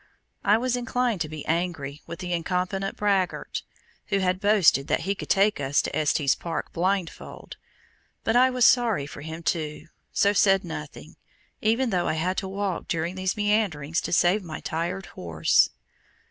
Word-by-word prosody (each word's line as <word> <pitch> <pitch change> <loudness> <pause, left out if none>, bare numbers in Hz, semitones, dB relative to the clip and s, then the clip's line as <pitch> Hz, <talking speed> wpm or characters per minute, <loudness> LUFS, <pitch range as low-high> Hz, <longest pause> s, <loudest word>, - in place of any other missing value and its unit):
I 210 +2 +5
was 250 +1 0
inclined 245 -4 -1
to 155 - -2
be 155 -1 -7
angry 160 -4 -2
with 170 - -6
the 180 0 -4
incompetent 180 +3 -2
braggart, 195 -3 0 0.5
who 200 - +1
had 185 -1 +1
boasted 195 -9 +4
that - - +1
he 195 +3 0
could 200 - -8
take 200 -1 +3
us 140 +1 +1
to - - -4
Estes 145 -2 +2
Park 170 -1 -5
"blindfold"; 185 0 -3 0.7
but 225 - +1
I 255 +1 +6
was 250 -2 +3
sorry 230 - +4
for 145 - -9
him 160 +2 -7
too, 155 -1 -2 0.2
so 200 0 +3
said 195 -1 +4
nothing, 155 -3 -8 0.4
even 230 +3 +1
though 180 -2 +1
I - - +1
had 175 +4 -1
to 195 - -2
walk 195 -1 -3
during 170 +1 -1
these 185 +2 -2
meanderings 200 -8 0
to - - -5
save 180 +4 +3
my 160 -3 -6
tired 170 +4 -3
horse. 80 -3 +2
180 Hz, 170 wpm, -25 LUFS, 160-205 Hz, 0.7 s, I